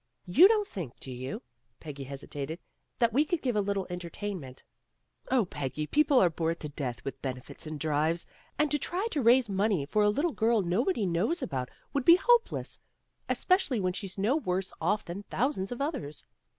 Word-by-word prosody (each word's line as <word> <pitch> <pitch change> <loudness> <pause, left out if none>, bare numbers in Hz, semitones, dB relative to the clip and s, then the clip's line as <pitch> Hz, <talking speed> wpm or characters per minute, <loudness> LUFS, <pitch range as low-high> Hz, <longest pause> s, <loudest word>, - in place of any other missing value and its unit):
' - - -51
' - - -48
"You 360 +5 +11
don't 420 -1 +2
think, 160 -11 -7
do 130 - -7
you," 130 - -5 0.4
Peggy 145 -3 -7
hesitated, 140 +3 -5 0.4
"that 235 -2 +2
we 285 +5 +5
could 320 +1 -2
give 250 -4 0
a 210 - +3
little 200 -1 -1
entertainment 175 -5 -6 0.3
" - - -43
"Oh, 255 -5 +3
Peggy, 145 -2 -4
people 290 - +3
are 175 - +4
bored 165 +1 -1
to 150 - -3
death 135 -4 -5
with 135 - -5
benefits 130 +4 -6
and 155 -1 -5
drives, 155 +3 +1 0.3
and 300 -1 +2
to 295 - +2
try 365 +9 -2
to 290 - 0
raise 245 +1 +5
money 195 -5 +1
for 210 +9 +1
a 210 - +5
little 290 +9 0
girl 225 -2 +2
nobody 215 - +1
knows 205 - 0
about 130 - -3 0.2
would 280 - 0
be 340 +5 +9
hopeless, 475 +5 +2 0.5
especially 365 - +2
when 185 -2 0
she's 195 0 -6
no 210 +8 +2
worse 190 -10 -1
off 205 +6 +1
than 175 +4 -5
thousands 245 -6 -1
of 245 - -4
others." 270 - -3
195 Hz, 195 wpm, -29 LUFS, -, 0.5 s, You